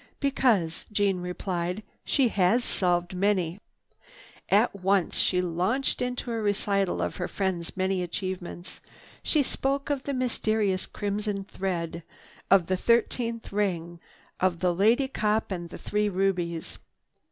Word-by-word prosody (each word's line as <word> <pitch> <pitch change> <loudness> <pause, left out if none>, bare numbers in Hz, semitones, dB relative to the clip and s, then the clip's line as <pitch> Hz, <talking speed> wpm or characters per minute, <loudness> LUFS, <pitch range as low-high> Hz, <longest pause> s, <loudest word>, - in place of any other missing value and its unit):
"Because," 235 - +1
Jeanne 200 -3 +2
replied, 180 +1 -3 0.2
"she 265 -4 +2
has 205 +5 +3
solved 175 -3 +1
many." 185 -2 +1 0.9
At 210 +2 +4
once 195 -1 +1
she 180 -1 +2
launched 185 +10 0
into 250 -1 -2
a 230 -1 -1
recital 200 -2 +1
of - - -3
her 180 - -2
friend's 185 -3 -2
many 190 0 +1
achievements. 180 0 -5 0.4
She 300 -3 +2
spoke 275 +2 -1
of 280 -2 0
the 280 0 -3
mysterious 215 -6 0
"Crimson 205 -1 -2
Thread," 170 -4 -3 0.5
of 195 -3 +6
the 185 +2 0
"Thirteenth 235 +1 +1
Ring," 175 -4 -1 0.4
of 180 -2 +1
the 180 -1 +3
"Lady 225 +9 +3
Cop 215 -5 0
and 175 -2 -4
the - - -8
Three 210 0 0
Rubies." 180 -4 -1
195 Hz, 130 wpm, -27 LUFS, 180-220 Hz, 0.9 s, of